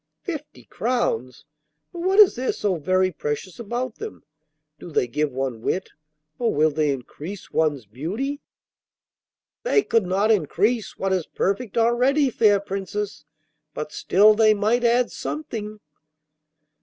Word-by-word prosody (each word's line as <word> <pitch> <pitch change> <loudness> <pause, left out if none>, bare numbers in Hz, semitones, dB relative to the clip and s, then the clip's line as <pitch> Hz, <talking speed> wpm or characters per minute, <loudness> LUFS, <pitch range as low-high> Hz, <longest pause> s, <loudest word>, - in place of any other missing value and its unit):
'Fifty 305 -5 -7
crowns! 130 - -2 0.5
But 345 - -7
what 375 +3 +1
is 415 -3 +8
there 255 +2 -1
so 205 -2 0
very 185 +4 +1
precious 150 +5 -4
about 240 +2 -4
them? 440 0 -8 0.6
Do - - -9
they 150 - +1
give 150 +5 -1
one 130 -3 -3
wit, 185 +10 -2 0.5
or 235 -2 +1
will 155 +1 +3
they 150 0 +1
increase 145 +8 -6
one's 145 -6 0
beauty?' 195 - -4 1.2
'They 450 -4 +2
could 225 -5 +1
not 200 +4 +2
increase 210 - +1
what 195 0 0
is 180 -4 -1
perfect 200 +3 -2
already, 250 +5 +3
fair 210 -3 +4
Princess, 195 -4 -5 0.5
but 150 0 -5
still 210 +3 +5
they 215 0 +4
might 220 +4 +1
add 240 +1 +3
something. 220 -9 -5
205 Hz, 135 wpm, -23 LUFS, 155-240 Hz, 1.2 s, is